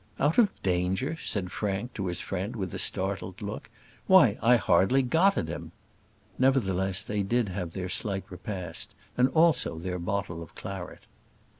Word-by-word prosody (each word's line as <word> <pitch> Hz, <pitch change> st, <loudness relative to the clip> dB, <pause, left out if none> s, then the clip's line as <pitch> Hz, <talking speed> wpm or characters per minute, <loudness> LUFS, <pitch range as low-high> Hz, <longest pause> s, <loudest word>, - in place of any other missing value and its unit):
"Out 150 Hz, -, +3 dB
of 220 Hz, -4 st, +6 dB
danger!" 95 Hz, -, 0 dB
said 95 Hz, -, -3 dB
Frank 105 Hz, +4 st, -3 dB
to 95 Hz, -3 st, -3 dB
his 90 Hz, -1 st, -2 dB
friend 95 Hz, +4 st, -4 dB
with 95 Hz, -5 st, -4 dB
a -, -, -3 dB
startled 95 Hz, -1 st, -1 dB
look. 105 Hz, -1 st, -6 dB, 0.4 s
"Why -, -, +6 dB
I 120 Hz, +2 st, +6 dB
hardly 120 Hz, +5 st, +3 dB
got 175 Hz, +10 st, +3 dB
at -, -, -1 dB
him." 80 Hz, +1 st, -6 dB, 0.7 s
Nevertheless, 95 Hz, -8 st, +2 dB
they 105 Hz, -1 st, -2 dB
did 115 Hz, +2 st, +1 dB
have 90 Hz, -3 st, -4 dB
their 95 Hz, -1 st, -3 dB
slight 95 Hz, +1 st, -1 dB
repast, 90 Hz, -2 st, -6 dB, 0.2 s
and 125 Hz, +1 st, +4 dB
also 160 Hz, -, +3 dB
their 90 Hz, +2 st, -4 dB
bottle 90 Hz, -2 st, -3 dB
of 80 Hz, -, -11 dB
claret. 95 Hz, -2 st, -7 dB
95 Hz, 160 wpm, -28 LUFS, 90-120 Hz, 0.7 s, of